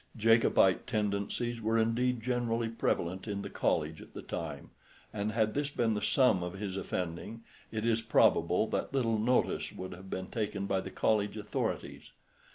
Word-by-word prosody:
Jacobite 115 -4 +4
tendencies 105 +3 -1
were 110 +1 +1
indeed 115 +1 +1
generally 120 -2 0
prevalent 95 -4 -1
in 100 -1 -3
the - - -6
College 80 +1 0
at - - -14
the - - -7
time, 75 -4 -6 0.4
and 105 0 -1
had 110 -1 +1
this 145 0 -1
been 115 -5 +1
the 105 - -2
sum 125 -9 +3
of 90 0 -4
his 95 -1 -4
offending, 95 +4 -4 0.3
it 110 0 -2
is 115 -1 +2
probable 90 -4 +3
that 130 - -3
little 115 -4 +1
notice 125 +4 +1
would 95 - -7
have 95 +2 -11
been 95 0 -3
taken 100 -1 -3
by 95 -1 0
the - - -6
College 105 -1 +1
authorities. 105 0 -3
110 Hz, 165 wpm, -31 LUFS, 95-115 Hz, 0.4 s, Jacobite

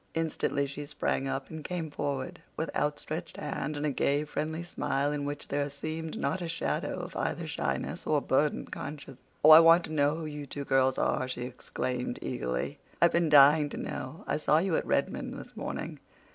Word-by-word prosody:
Instantly 160 -3 0
she 140 +1 -6
sprang 145 -2 -1
up 135 0 -3
and 160 -1 -6
came 165 -3 -4
forward 140 -2 -3 0.2
with 160 - -3
outstretched 155 +3 -2
hand 150 +2 -3
and 145 - -2
a 150 - +1
gay, 140 +2 +1
friendly 155 +2 -3
smile 145 -4 -1
in 145 -1 -2
which 145 0 -5
there 145 0 0
seemed 155 +3 -5
not 160 +7 -1
a 170 - -3
shadow 165 - -2
of - - -8
either - - -2
shyness 65 -1 -3
or 150 -1 +3
burdened 145 +2 +1
conscience. 140 -2 -7 0.3
"Oh, 155 - +10
I 155 - +12
want 165 +1 +7
to 155 - -6
know 145 0 +3
who 160 0 -5
you 150 -1 -6
two 140 +1 -5
girls 130 -1 +3
are," 130 - +1
she 125 -1 -5
exclaimed 125 0 -3
eagerly. 60 0 -2 0.2
"I've 170 0 +5
been 170 -2 +2
dying 145 +1 +7
to - - -6
know. 130 +5 -5
I - - 0
saw 155 0 +3
you 175 0 +2
at - - -1
Redmond - - -1
this - - -11
morning. - - -5
145 Hz, 195 wpm, -30 LUFS, 140-160 Hz, 0.3 s, I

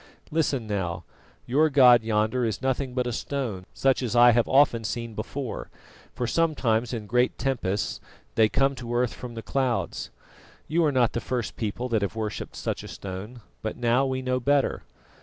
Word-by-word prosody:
Listen 145 -6 0
now: 90 -5 -3 0.4
your 150 +6 +3
god 125 -5 +7
yonder 110 +2 +1
is 110 -4 -1
nothing 130 0 -1
but 125 -1 +1
a 120 - -1
stone 115 -7 -3
such 135 -1 +2
as 120 -2 -2
I 120 0 +8
have 120 0 +2
often 135 -4 +4
seen 115 +1 -4
before, 120 +4 -5 0.5
for 125 - -1
sometimes 125 -6 +1
in 115 -4 -4
great 125 +4 +1
tempests 115 -8 -1 0.3
they 110 -1 +4
come 135 +3 +2
to 120 -1 -4
earth 120 -1 +1
from 120 -2 -8
the 115 - -6
clouds. 130 -3 -1 0.6
You 165 +2 +2
are 150 - +3
not 125 -4 +2
the 120 - -2
first 120 -7 -3
people 115 +3 -3
that 110 -3 +1
have 100 +2 -2
worshipped 110 -2 -4
such - - -3
a - - -9
stone, 100 +6 -7 0.2
but 110 - -4
now 120 +2 +2
we 130 0 -2
know 130 0 0
better. 140 +2 +1
120 Hz, 180 wpm, -26 LUFS, 110-130 Hz, 0.6 s, I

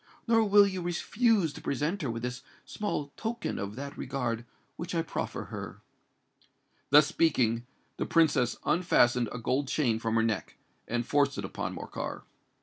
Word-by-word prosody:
Nor 225 -1 +4
will 205 0 +7
you 190 -2 -2
refuse 185 - +1
to - - -10
present 155 +7 -1
her 140 - -2
with 115 0 -4
this 125 +1 -3 0.2
small 150 -9 -3
token 230 0 -3
of 100 +1 -4
that 140 +2 -6
regard 125 -3 -3 0.3
which 170 +1 -5
I 165 - +1
proffer - - -4
her." - - -7 1.1
Thus 150 +1 +8
speaking, 125 -7 +1 0.3
the - - -2
Princess 145 -7 +3
unfastened 125 -9 +3
a - - -5
gold 130 +4 0
chain 120 -6 +1
from 115 0 -1
her 115 - +3
neck, 105 -7 -2 0.3
and 120 0 -1
forced 140 0 +2
it 100 - -3
upon - - -4
Morcar. - - -5
140 Hz, 160 wpm, -29 LUFS, 120-175 Hz, 1.1 s, Thus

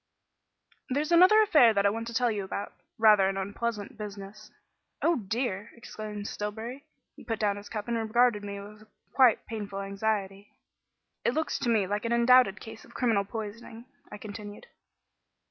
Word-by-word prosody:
"There's 295 +5 -1
another 370 +6 +7
affair 250 - +5
that 200 0 +2
I 200 - +4
want 225 +2 -5
to 235 - -6
tell 245 -1 +2
you 205 -2 -3
about; 195 +1 -5 0.2
rather 210 -4 +5
an 195 - -3
unpleasant 205 +2 -4
business." 205 0 -9 0.5
"Oh, 335 -1 +3
dear!" 210 -1 -3
exclaimed 215 -3 -7
Stillbury. 225 +7 -6 0.3
He - - -14
put 225 -1 -3
down 205 -2 +1
his 205 0 -10
cup 210 -1 -5
and 235 - -1
regarded 225 -1 +2
me 200 0 -6
with 210 +2 -12 0.3
quite 255 -5 +4
painful 205 -3 -6
anxiety. 200 0 -3 0.7
"It 235 - +1
looks 315 -1 -1
to 240 - -1
me 220 -4 +3
like 205 +4 -3
an 230 - 0
undoubted 235 -3 +5
case 225 0 -10
of - - -18
criminal 225 -5 +1
poisoning," 225 +2 -8 0.3
I 210 - -7
continued. 205 - -9
215 Hz, 165 wpm, -28 LUFS, 205-235 Hz, 0.7 s, another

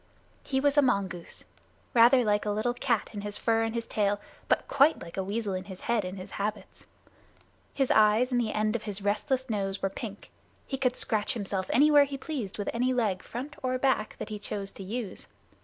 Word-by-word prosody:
He 265 - -1
was 285 +1 +2
a - - +8
mongoose, 195 -9 -1 0.5
rather 245 +2 +6
like 210 0 +2
a - - +1
little 215 +4 0
cat 240 -3 0
in 205 - -5
his 205 0 -4
fur 225 -1 +2
and 225 0 -1
his 230 0 -2
tail, 205 -1 0 0.3
but - - +2
quite 290 +4 +4
like 170 -1 -9
a 190 - -1
weasel 205 +1 -2
in 185 0 -4
his 190 -2 -9
head 235 -3 +1
and 185 +1 -5
his 185 +1 -8
habits. 210 +1 -5 0.8
His 270 -2 +1
eyes 220 +4 +4
and 245 -1 +2
the 220 -2 -1
end 215 +1 0
of 235 - -1
his 205 -2 -4
restless 255 +6 0
nose 195 -4 -2
were 195 - -1
pink. 205 -1 -8 0.3
He 270 - -4
could 250 -2 +1
scratch 215 +2 0
himself 195 -3 -3
anywhere 290 +1 +6
he 275 0 -5
pleased 265 - -5
with 205 - -2
any 250 +2 +1
leg, 210 -7 +1
front 270 +5 -7
or 255 0 0
back, 255 -5 +1
that - - -6
he 210 -1 -5
chose 200 -1 -5
to 195 - -9
use. 215 0 -5
215 Hz, 210 wpm, -29 LUFS, 200-255 Hz, 0.8 s, a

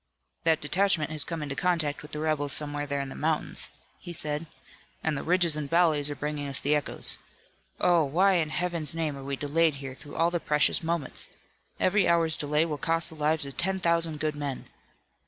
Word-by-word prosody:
"That 160 -1 +3
detachment 165 0 +2
has 155 -2 +4
come 165 -3 -5
into 140 -1 -4
contact 165 -5 0
with 150 - -12
the - - -1
rebels 150 -2 +1
somewhere 145 -1 +1
there 140 0 -2
in 135 - -5
the - - -7
mountains," 155 0 -1 0.3
he 175 - -8
said, 150 -1 -1 0.6
"and 160 -1 0
the - - -3
ridges 175 -2 +3
and 150 -2 -4
valleys 160 -4 +3
are 145 - -4
bringing 145 0 -4
us 140 -1 0
the 145 - +1
echoes. 150 -1 -1 0.6
Oh, 175 -2 +4
why 185 +8 +3
in 160 -3 0
Heaven's 170 -2 0
name 160 -3 -2
are 135 - -9
we 140 0 -3
delayed 150 +2 +1
here 135 -1 -7
through 145 +2 -12
all 170 +1 +2
the 175 - 0
precious 150 -2 +2
moments! 165 -4 -3 0.5
Every 200 +2 +3
hour's 165 -2 +3
delay 150 +2 +1
will 150 -3 -4
cost 165 0 +2
the 160 - -8
lives 155 0 +1
of 140 - -9
ten 190 +2 0
thousand 165 -3 +1
good 155 0 -1
men!" 145 -3 -4
155 Hz, 205 wpm, -27 LUFS, 145-165 Hz, 0.6 s, has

